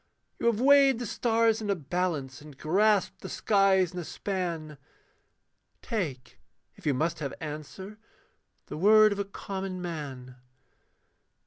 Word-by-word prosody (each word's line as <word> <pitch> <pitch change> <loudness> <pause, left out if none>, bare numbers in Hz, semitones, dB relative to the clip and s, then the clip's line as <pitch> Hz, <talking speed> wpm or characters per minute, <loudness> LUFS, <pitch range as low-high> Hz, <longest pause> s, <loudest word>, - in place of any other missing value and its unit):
You - - 0
have 230 -2 +2
weighed 275 -1 +6
the 240 - -4
stars 225 0 +1
in 210 - -4
a 200 - +2
balance, 150 -4 -3
and 150 -2 -13
grasped 200 +6 +1
the - - -7
skies 195 -4 +2
in 180 - -5
a - - -4
span: 165 -6 -4 1.0
Take, 160 - -4 0.4
if - - -9
you 140 - +2
must 160 +4 -1
have 140 -3 -4
answer, 155 +8 -8 0.7
the - - -7
word 215 +4 +6
of 200 - -3
a 200 - -1
common 195 -1 -6
man. 140 -8 -7
185 Hz, 140 wpm, -28 LUFS, 155-210 Hz, 1.0 s, weighed